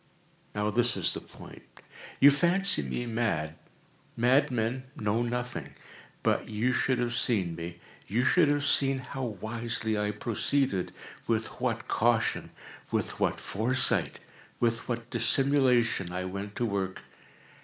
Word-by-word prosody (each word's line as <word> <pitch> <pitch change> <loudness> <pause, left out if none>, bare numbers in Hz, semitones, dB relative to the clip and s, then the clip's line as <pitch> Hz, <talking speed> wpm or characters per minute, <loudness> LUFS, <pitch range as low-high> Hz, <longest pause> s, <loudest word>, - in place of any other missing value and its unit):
Now 105 +1 0
this 120 +2 +1
is - - +1
the - - -5
point. - - -13 0.6
You 145 - +8
fancy 175 - +2
me 70 - -3
mad. 110 -10 -1 0.6
Madmen 125 0 +1
know 105 +2 0
nothing. 120 +1 -4 0.5
But - - 0
you 110 +4 0
should 130 0 +1
have 120 0 -1
seen 100 -8 +1
me. 85 +1 -7 0.3
You 115 +6 0
should 165 +4 +4
have 145 0 +1
seen 135 -1 +4
how 130 +1 -6
wisely 110 0 -3
I 105 0 0
proceeded—with 110 0 -2 0.2
what - - -1
caution—with - - -1
what - - 0
foresight—with 115 0 +1
what 115 -1 -4
dissimulation 120 -5 +2
I 90 +1 -3
went 100 +2 -6
to 120 - -1
work! 95 -3 -3
115 Hz, 120 wpm, -29 LUFS, 105-130 Hz, 0.6 s, You